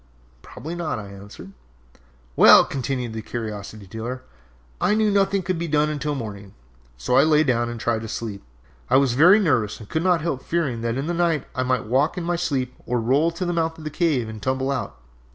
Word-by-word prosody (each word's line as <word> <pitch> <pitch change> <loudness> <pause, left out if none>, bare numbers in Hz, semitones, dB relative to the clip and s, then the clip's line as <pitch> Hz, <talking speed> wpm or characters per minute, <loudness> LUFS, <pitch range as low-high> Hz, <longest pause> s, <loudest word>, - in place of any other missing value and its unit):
"Probably 160 - -8
not," 170 -6 -3
I 100 -2 -8
answered. 100 -1 -11 0.8
"Well," - - +8
continued 125 -3 -3
the 110 - -5
curiosity 110 -2 -6
dealer, 115 +6 -6 0.6
"I 185 +4 +3
knew 215 -1 +2
nothing 195 -1 +2
could 180 -1 -2
be 170 - -2
done 150 0 +1
until 150 0 -2
morning, 100 -6 -7 0.4
so - - -1
I - - +8
lay 155 -1 +4
down 120 -4 0
and 120 0 -6
tried 115 -1 -1
to 110 - -6
sleep. 110 -2 -5 0.5
I - - +5
was 135 -3 +3
very 175 - +6
nervous 125 - +1
and 110 - -11
could 160 - -1
not 180 -3 +3
help 150 -5 -2
fearing 140 -9 -2
that 115 +1 -2
in 135 - -2
the 175 - -2
night 170 -4 0
I 130 - -2
might 130 -2 0
walk 135 - +1
in 180 - -3
my 175 +1 0
sleep 135 -7 -2
or 125 0 0
roll 135 +8 +2
to 170 +2 -4
the 175 - -1
mouth 165 -1 -1
of 160 - -11
the 155 - -5
cave 150 -8 0
and 110 -1 -8
tumble 130 +3 -1
out. 140 - -4
135 Hz, 215 wpm, -23 LUFS, 115-165 Hz, 0.8 s, Well